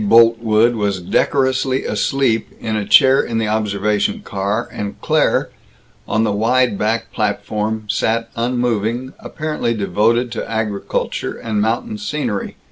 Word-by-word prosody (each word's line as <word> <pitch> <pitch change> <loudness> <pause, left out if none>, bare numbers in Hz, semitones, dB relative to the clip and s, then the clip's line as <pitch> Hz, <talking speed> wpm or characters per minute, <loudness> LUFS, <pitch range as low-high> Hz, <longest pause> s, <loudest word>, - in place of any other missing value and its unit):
Boltwood 115 0 +5
was 100 -4 -1
decorously 130 +7 +1
asleep 130 -5 0
in 110 -1 -3
a 105 -2 -2
chair 135 0 +6
in 115 - -3
the 110 -1 0
observation 105 -1 0
car, 100 +4 -2
and 100 -1 -5
Claire, - - +1 0.6
on 110 - +1
the 110 - +1
wide 115 +2 +2
back 110 +3 -1
platform, 110 +1 -2
sat 115 +3 0
unmoving, 120 0 -1
apparently 150 -7 -3
devoted 115 +4 +1
to - - -5
agriculture 110 -3 -2
and 110 -2 -2
mountain 120 - -1
scenery. 150 - -3
115 Hz, 125 wpm, -18 LUFS, 105-120 Hz, 0.6 s, chair